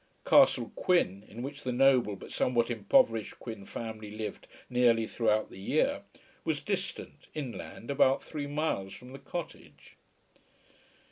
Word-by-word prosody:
Castle - - +5
Quin, 140 - +2
in 115 +4 -7
which 140 +2 -6
the 130 - -2
noble 125 -4 +4
but - - -11
somewhat 120 -1 +1
impoverished 110 0 +2
Quin 110 -5 -8
family 110 -1 -6
lived 105 -1 -6 0.2
nearly 120 -2 +3
throughout 110 -1 +1
the - - -11
year, 95 - +1 0.4
was - - 0
distant, - - -4
inland, 135 -3 -6
about 135 -1 +3
three 145 -2 -5
miles 145 -10 -2
from 125 +5 -11
the 135 - -8
cottage. 175 -1 -8
120 Hz, 135 wpm, -30 LUFS, 110-135 Hz, 0.4 s, Castle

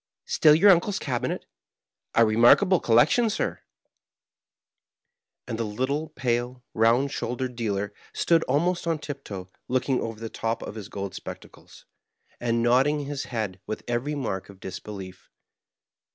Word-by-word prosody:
"Still 150 -1 +5
your 195 +5 +7
uncle's 190 +3 +2
cabinet? 125 -8 -2 0.7
A 115 - +6
remarkable 120 - +5
collector, 120 - +4
sirl" - - -2 1.9
And 115 -2 -5
the - - +1
little 130 +9 -2
pale, 120 0 -2
round 120 +5 +3
shouldered 125 -1 -3
dealer 105 -3 -2 0.2
stood 165 -1 +3
almost 170 +6 0
on 165 -1 +1
tip 145 -2 -7
toe, 95 -2 -8 0.2
looking 130 +1 +1
over 115 -1 -5
the 115 - -5
top 115 +1 -3
of - - -6
his 105 -2 -8
gold 100 -2 -5
spec - - -7
tacles, - - -17 0.5
and 115 -1 0
nodding 135 +5 +3
his 140 -1 -4
head 110 -6 -3
with 110 - -4
every 120 +5 -1
mark 95 -10 -3
of 100 -1 -14
disbe 95 - -8
lief. 95 -3 -9
120 Hz, 145 wpm, -26 LUFS, 110-145 Hz, 1.9 s, your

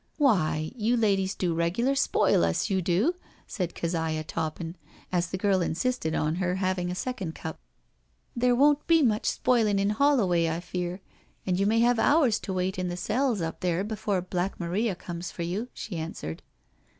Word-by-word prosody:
" - - -41
Why, 160 - +2
you 235 +1 +1
ladies 195 -4 +1
do 175 -3 0
regular 175 +11 +1
spoil 275 - +3
us, 85 - 0
you 190 -1 +2
do," 185 - +2 0.3
said 180 -7 -4
Keziah 160 -2 -1
Toppin, 165 +1 -4 0.4
as 175 -1 +1
the 190 - -3
girl 190 -1 +2
insisted 170 0 -1
on 155 +2 0
her 180 -1 0
having 185 -1 -1
a 180 - -3
second 195 -6 -4
cup. 160 - -6 0.4
" - - -42
There 245 +1 +3
won't 290 +3 +3
be 330 -2 +5
much 215 -4 +1
spoiling 225 -5 +2
in 200 +1 +2
HoUoway, 210 - +3
I 160 +1 -2
fear, 180 +1 -4 0.4
and 185 -1 0
you 200 - +2
may 225 +2 +3
have 240 0 +3
hours 280 -8 +4
to 190 - -5
wait 185 0 -1
in 180 - -1
the 175 0 -4
cells 230 +2 0
up 165 - -4
there 180 +1 0
before 205 -3 -2
Black 185 +1 -2
Maria 190 +4 -1
comes 175 0 -6
for 170 - -5
you," 190 +8 -3
she 200 - -7
answered. 160 - -5
185 Hz, 185 wpm, -27 LUFS, 170-225 Hz, 0.4 s, be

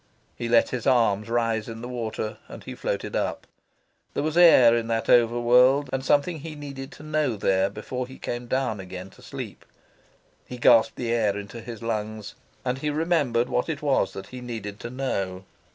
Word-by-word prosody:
He 120 - -4
let 115 0 +4
his 125 -3 -3
arms 115 -4 +3
rise 115 -2 0
in 115 0 -7
the - - -4
water, 110 -3 -4
and - - -10
he - - -7
floated - - -3
up. - - -2 0.7
There 140 - 0
was 155 +1 -1
air 135 -9 +7
in 115 -1 -1
that 115 -1 0
over 120 0 +5
world, 125 +4 +4
and 135 0 -1
something 145 +4 +2
he 155 +1 -7
needed 140 -2 -8
to - - -13
know 155 -5 0
there 95 -1 +2
before 125 +5 -5
he 130 - -11
came 120 0 -5
down 130 -4 -1
again 95 0 -8
to - - -18
sleep. - - -8 0.8
He 125 - -7
gasped 120 -2 +5
the 120 -2 -2
air 105 -4 +1
into 105 +3 -7
his 115 -1 -8
lungs, 110 -2 -3 0.3
and 125 +1 -1
he 150 - -1
remembered 145 -7 +1
what 125 +5 -1
it 150 -2 -4
was 140 -2 +1
that 95 - -8
he 125 0 -8
needed 110 -4 -6
to 120 - -6
know. 100 -8 -3
120 Hz, 195 wpm, -25 LUFS, 110-135 Hz, 0.8 s, air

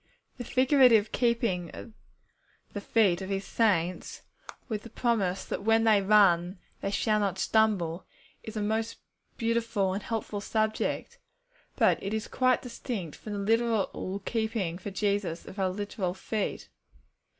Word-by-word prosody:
'_ - - -36
The 245 - -5
figurative 255 -4 +4
keeping 230 -8 0
of 225 - -10 0.8
the 205 - -4
feet 200 -5 +2
of 190 - -5
His 195 0 -2
saints, 185 -6 0 0.4
with 215 -4 -3
the 235 - -11
promise 205 -8 0
that - - -4
when 225 +2 +3
they 215 -3 +5
run 190 -3 +4 0.2
they - - -1
shall 215 +1 +1
not 195 -3 -1
stumble, 190 -6 +1 0.3
is 220 0 -7
a 210 - -1
most 220 +2 -1 0.4
beautiful 225 -4 0
and 200 - -3
helpful 215 -2 -4
subject. 215 +1 -1 0.6
But - - +3
it 200 +2 -2
is 220 - -3
quite 255 -1 +2
distinct 235 - -5
from 210 - -8
the - - -3
literal 205 -2 0
keeping 220 -7 -2
for 205 - -6
Jesus 200 -4 -1
of 200 - -9
our 190 -1 +2
literal 190 -1 -3
feet. 210 +1 -3
210 Hz, 150 wpm, -28 LUFS, 190-225 Hz, 0.8 s, they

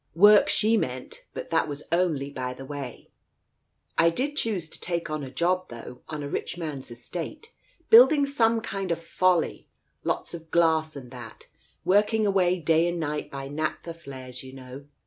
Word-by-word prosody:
Work, 205 +4 +7
she 220 +1 +3
meant, 125 -8 -4
but - - -7
that 165 -1 +2
was 145 0 -6
only 165 -6 +1
by 125 -2 -4
the 135 - -9
way. 135 -3 -7 0.9
I 165 - +6
did 270 - -1
choose 210 - -1
to - - -9
take 170 -2 -2
on 155 -1 -2
a 135 - -6
job, 180 +7 0
though, 120 +1 -9
on 155 -2 -5
a - - -3
rich 145 - -4
man's 150 -7 -5
estate, 175 - -7 0.4
building 315 - +8
some 230 -5 +2
kind 195 -4 -3
of 170 - +1
Folly, 170 +1 +1 0.4
lots - - -2
of 165 -1 -9
glass 160 -2 +2
and 125 -3 -9
that, 120 -3 -11 0.4
work 210 +4 +4
ing 220 -1 +2
away 185 -3 +3
day 165 +1 +3
and 175 0 -2
night 150 -1 -3
by 135 0 -6
naphtha 155 +3 -3
flares, 130 -6 -9
you 130 0 -11
know. 135 +1 -10
165 Hz, 180 wpm, -26 LUFS, 140-185 Hz, 0.9 s, building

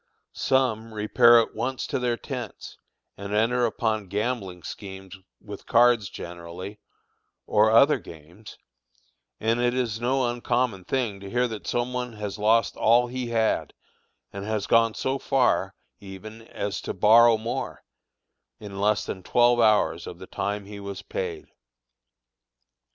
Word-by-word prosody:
Some 115 -4 0
repair 120 +3 +6
at 115 - -1
once 130 +4 -3
to - - -2
their 120 -1 0
tents - - -7 0.4
and 100 +1 -4
enter 120 +3 +2
upon 110 -3 -2
gambling 100 -3 -3
schemes 95 -2 -9 0.2
with 100 -1 -10
cards 120 -4 +4
generally, 85 +4 -8 0.7
or 105 +1 +3
other 135 +5 +5
games; 85 +4 -13 0.8
and 115 +2 +1
it 120 0 +1
is 120 -3 -2
no 130 +1 +1
uncommon 120 -4 -1
thing 115 -4 -2
to 100 0 -9
hear 125 +3 +1
that 110 -2 -7
some 120 +1 -1
one 125 -1 -3
has 105 -1 -6
lost 110 +2 +2
all 120 +2 +4
he 125 0 -4
had, 115 -2 0 0.6
and 100 0 -6
has 105 -1 -2
gone 115 -1 +3
so 135 +1 -2
far 135 -3 +1 0.2
even 100 +3 -10
as 100 -1 -4
to - - -5
borrow 115 +4 +6
more, 115 +2 -5 0.8
in 100 -2 -7
less 105 +1 +2
than 95 - -5
twelve 120 +5 +3
hours 105 -7 +2
of 85 - -8
the 95 - -10
time 100 +1 -3
he 100 0 -9
was 100 -1 -7
paid. 85 -4 -5
110 Hz, 145 wpm, -25 LUFS, 100-120 Hz, 0.8 s, repair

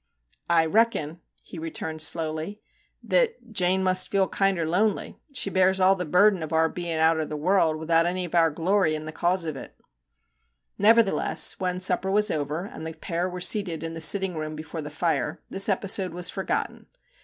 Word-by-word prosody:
' - - -37
I 165 -1 +4
reckon/ 170 -5 0 0.2
he 170 - -10
re 165 +1 -5
turned 160 0 -5
slowly, 160 +5 -1 0.2
* - - -39 0.2
that 455 - 0
Jane 190 -2 +2
must 185 0 +2
feel 195 -1 +1
kinder 190 -5 0
lonely; 200 +5 -1
she 250 -7 -1
bears 190 0 +2
all 190 +1 +5
the 180 -2 -4
burden 185 +3 +3
of 160 - -6
our 160 0 +3
bein' 170 -2 -4
outer 160 0 +2
the 150 0 -6
world, 165 0 +2
without 165 +1 +1
any 180 +1 -2
of 170 - -10
our 165 -1 +4
glory 170 +1 +1
in 155 0 -6
the 155 - -6
cause 175 +2 0
of 155 -2 -4
it/ 135 - -11 1.0
Nevertheless, 220 0 +3
when 180 -1 -2
supper 185 +1 +1
was 210 +1 +3
over, 155 +3 -3
and 180 - -10
the 160 0 -6
pair 175 0 -3
were 180 0 -7
seated 180 -4 +1
in 165 0 -5
the 165 - -7
sitting 190 +3 +3
room 155 0 -5
before 155 +1 -7
the 150 - -7
fire, 160 +2 -2
this 195 +2 +1
episode 190 -2 -1
was 180 0 0
forgotten. - - -4
175 Hz, 195 wpm, -25 LUFS, 160-190 Hz, 1.0 s, all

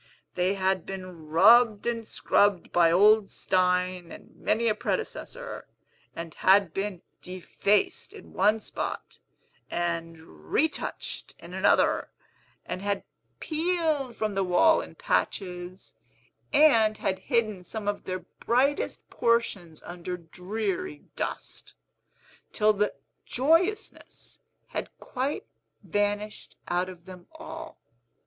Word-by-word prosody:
They 185 +2 +1
had 190 -2 +1
been 185 -4 -8
rubbed 215 +6 +6
and 230 -2 -2
scrubbed 200 -3 +2
by 170 -1 +5
old 205 +3 +5
Stein 180 -1 0
and - - -13
many 230 +2 +1
a 215 - +4
predecessor, - - -4 0.5
and 165 -1 -6
had 190 -3 +4
been 195 -3 -3 0.2
defaced 185 +3 0
in - - -13
one 215 +2 +3
spot, - - -5 0.5
and 170 -1 -2
retouched 160 - -3
in - - -12
another, - - +3 0.6
and 185 - -4
had 200 0 -1 0.4
peeled 315 -6 0
from 215 -2 -1
the 195 0 +1
wall 190 - +4
in - - -10
patches, 180 -1 -2 0.6
and 225 -8 +5
had 190 - -1
hidden 215 -7 0
some 215 +2 -6
of 205 0 -2
their 185 0 -3 0.2
brightest 270 +5 +1
portions 200 -9 0
under 180 +1 -6
dreary 180 -1 -4
dust, - - -5 0.8
till 215 -1 +3
the 210 0 0 0.3
joyousness 335 - 0 0.3
had - - -4
quite 265 +3 -3 0.4
vanished 205 +2 -2
out 180 +1 0
of 175 -2 -12
them 180 -2 -12
all. - - -9
200 Hz, 115 wpm, -27 LUFS, 180-230 Hz, 0.8 s, rubbed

